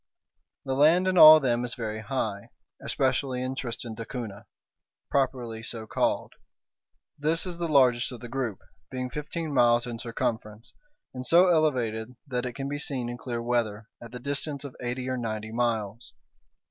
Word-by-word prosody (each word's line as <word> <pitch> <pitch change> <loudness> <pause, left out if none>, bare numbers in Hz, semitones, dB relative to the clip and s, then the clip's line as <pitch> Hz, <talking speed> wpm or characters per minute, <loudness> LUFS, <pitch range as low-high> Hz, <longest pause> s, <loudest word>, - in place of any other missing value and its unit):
The 135 - -1
land 160 +7 +4
in 185 - +1
all 155 -2 +11
of 155 - -3
them 120 -2 +1
is 120 -1 -4
very 110 -2 -4
high, 110 -4 -3 0.3
especially 130 -1 0
in 130 +1 -2
Tristan 120 -3 -5
d'Acunha, 110 -2 -7 0.6
properly 125 -5 -1
so 115 -1 -5
called. 100 - -1 0.9
This 160 +4 +1
is 175 -2 -5
the 170 - -1
largest 130 -5 +3
of 125 - -8
the 120 - -8
group, 120 -5 -3 0.3
being 125 -1 -4
fifteen 150 +2 -4
miles 120 -2 +4
in 120 -2 -6
circumference, 110 -1 -4 0.4
and 125 -1 -5
so 175 +7 +6
elevated 125 -8 +1
that 125 -3 -2
it 125 - -5
can 135 +2 -4
be 145 +1 -3
seen 130 -5 -1
in 120 - -5
clear 120 -2 -4
weather 115 -3 -1
at 120 - -10
the 125 - -7
distance 140 +2 -3
of 140 -3 -8
eighty 125 +1 -3
or 130 0 -1
ninety 110 -2 -4
miles. 115 -1 -2
125 Hz, 170 wpm, -27 LUFS, 115-140 Hz, 0.9 s, all